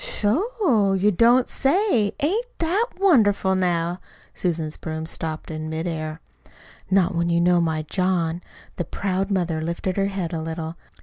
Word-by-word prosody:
"Sho, 270 - +1
you 195 +2 +3
don't 240 +6 +4
say! 275 - +2
Ain't 415 - 0
that 370 +8 +1
wonderful, 215 - +4
now?" 175 -1 0 0.3
Susan's 160 -3 -2
broom 160 -1 -5
stopped 160 0 -4
in 155 0 -5
midair. 160 -1 -4 0.7
"Not 190 -1 +3
when 170 0 0
you 170 0 +2
know 175 0 +4
my 160 -2 0
John!" 175 0 0 0.4
The 175 - -1
proud 195 +3 -2
mother 175 -5 0
lifted 170 +3 -3
her 195 0 +2
head 190 -4 -3
a 160 - -2
little. 160 0 -5
180 Hz, 145 wpm, -23 LUFS, 165-210 Hz, 0.7 s, don't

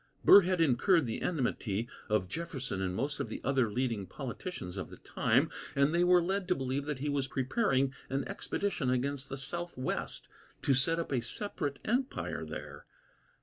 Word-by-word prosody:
Burr 200 - +10
had 185 0 0
incurred 165 +3 +4
the 115 - -3
enmity 120 - -1 0.2
of 105 -4 +2
Jefferson 135 - -4
and 90 -1 -1
most 140 +7 -2
of - - -2
the - - -5
other 130 -4 +2
leading 115 -4 -1
politicians 130 - -6
of 95 - -5
the - - -11
time, - - +1 0.2
and 140 +3 +3
they 170 +1 +4
were 180 -1 +5
led 190 +1 -1
to 180 - +3
believe 135 +1 -2
that 150 -2 -2
he 140 +3 -3
was 140 -2 0
preparing 135 - +1 0.2
an 135 0 -1
expedition 195 -10 -2
against 135 +2 -1
the 135 - -4
southwest, 135 -1 -2 0.4
to 140 - +4
set 140 +6 +2
up 170 - -3
a 130 -3 +1
separate 145 - -2
empire 250 +4 -1
there. - - -8
135 Hz, 175 wpm, -32 LUFS, 125-170 Hz, 0.4 s, Burr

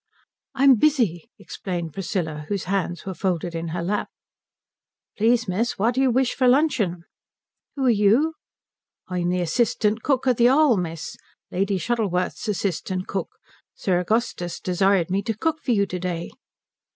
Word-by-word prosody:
"I'm 270 -1 +6
busy," 230 - +1
explained 170 0 -5
Priscilla, 165 -5 -3
whose 200 -2 -1
hands 180 -2 -2
were 190 - -4
folded 175 -1 -2
in 165 0 -4
her 170 +1 -3
lap. 205 +4 -1 1.1
"Please 230 +1 +2
miss, 210 +6 -1
what 225 +5 +2
do 260 - +1
you 265 - +4
wish 255 0 +2
for 255 - +2
luncheon?" 245 - +2 0.7
"Who 275 -2 -1
are - - +5
you?" 225 +9 +3 0.8
"I'm 175 -1 -1
the 180 0 0
assistant 215 +4 +1
cook 265 -1 0
at 250 -3 +3
the 240 - +5
'All, 280 -2 +5
miss. 165 -4 -4 0.3
Lady 195 +2 0
Shuttleworth's 195 0 -1
assistant 185 -2 -2
cook. 195 - -4 0.4
Sir 180 -2 0
Augustus 180 -3 -1
desired 185 -1 +1
me 195 +1 +1
to 215 +1 -3
cook 315 +6 -1
for - - -7
you 205 -4 +3
to 180 -2 -5
day." 175 -2 -4
195 Hz, 155 wpm, -23 LUFS, 175-240 Hz, 1.1 s, I'm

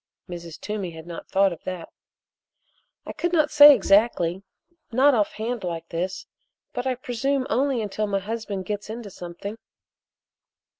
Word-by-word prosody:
Mrs. 170 -2 -8
Toomey 210 -4 -4
had 160 -1 -10
not 170 -1 -8
thought 195 -1 +3
of 170 - -12
that. 185 -3 -6 1.2
"I - - -6
could 335 +3 -2
not 310 -3 +2
say 295 0 +10
exactly 195 -4 +2 0.5
not 270 +5 +5
off 210 -4 +1
hand 230 0 -4
like 170 -2 -4
this 185 +3 -3 0.5
but 245 +1 -3
I 255 - +1
presume 255 +2 -1
only 260 -2 +1
until 210 +1 -2
my 200 -1 0
husband 200 -1 -4
gets 205 +1 -4
into 220 -2 -7
something." 180 +5 -8
210 Hz, 150 wpm, -24 LUFS, 180-245 Hz, 1.2 s, say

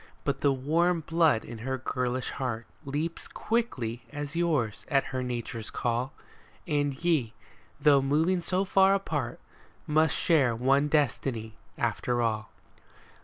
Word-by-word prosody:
But 140 -2 -1
the 140 - +4
warm 165 +6 +1
blood 160 -6 +2
in 115 -1 -8
her 130 +3 -2
girlish 125 0 -2
heart 120 -4 -3 0.2
Leaps 150 +4 -3
quick 235 +1 -1 0.4
as 145 0 -5
yours 150 -11 0
at 140 -2 +3
her 130 - -1
nature's 120 -3 -4
call. 120 +2 -1 0.5
And 145 -2 +1
ye, 145 -10 +2 0.4
though 140 -2 +5
moving 160 +7 +2
so 185 +3 0
far 195 0 +5
apart, 150 -11 -2 0.5
Mifst 155 +1 +3
share 150 -10 +3
one 135 +5 +3
destiny 120 -6 0 0.2
after 120 -1 0
all. 110 -2 0
140 Hz, 130 wpm, -28 LUFS, 120-160 Hz, 0.5 s, though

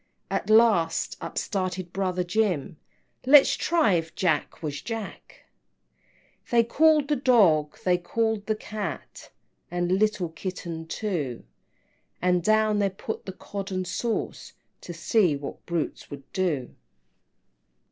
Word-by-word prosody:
At - - -2
last 215 -7 +4
up - - -6
started 185 -3 -3
brother 185 -2 -1
Jim, 180 -6 -1 0.5
"Let's 280 0 +7
try 325 - +2
if 165 -2 -1
Jack, 170 -2 -1
was 145 -2 -4
Jack!" 225 -3 -7 1.0
XV. - - -26
They 235 -1 +5
called 300 +4 +3
the 295 - +2
Dog, 195 - +3
they 180 -1 +2
called 220 +3 -1
the 215 - +1
Cat, 215 -1 -6 0.4
And 175 0 -1
little 210 -5 +1
Kitten 165 -1 -6
too, 160 - -3 0.8
And 180 0 +2
down 215 +1 +3
they 200 -1 +2
put 195 +3 -7
the - - -3
Cod 195 +1 -7
and 185 -1 -2
sauce, 230 +5 -3 0.3
To - - -8
see 175 0 +2
what 140 0 -7
brutes 170 -2 -3
would 140 -1 -8
do. 160 -10 -1
185 Hz, 130 wpm, -26 LUFS, 170-220 Hz, 1.0 s, Let's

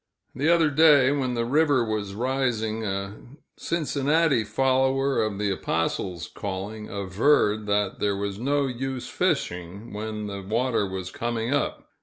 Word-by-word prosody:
The 145 +6 0
other 165 -3 +4
day, 145 -3 +6
when 130 -3 -1
the 115 0 0
river 145 -1 +3
was 105 -3 -3
rising, 115 -3 -1
a 100 0 -3 0.4
Cincinnati 150 -4 +1
follower 135 +4 +1
of 110 -2 -1
the 105 -1 0
apostle's 85 -1 -2
calling 100 +2 -6
averred 105 +2 +1
that 100 -1 0
there 100 -1 0
was 100 0 -3
no 140 +3 +1
use 130 0 -4
fishing 90 +5 -2
when 105 0 -4
the 100 -1 -5
water 115 +2 0
was 95 -1 -5
coming 120 +1 -2
up. 145 - -1
115 Hz, 140 wpm, -25 LUFS, 100-135 Hz, 0.4 s, day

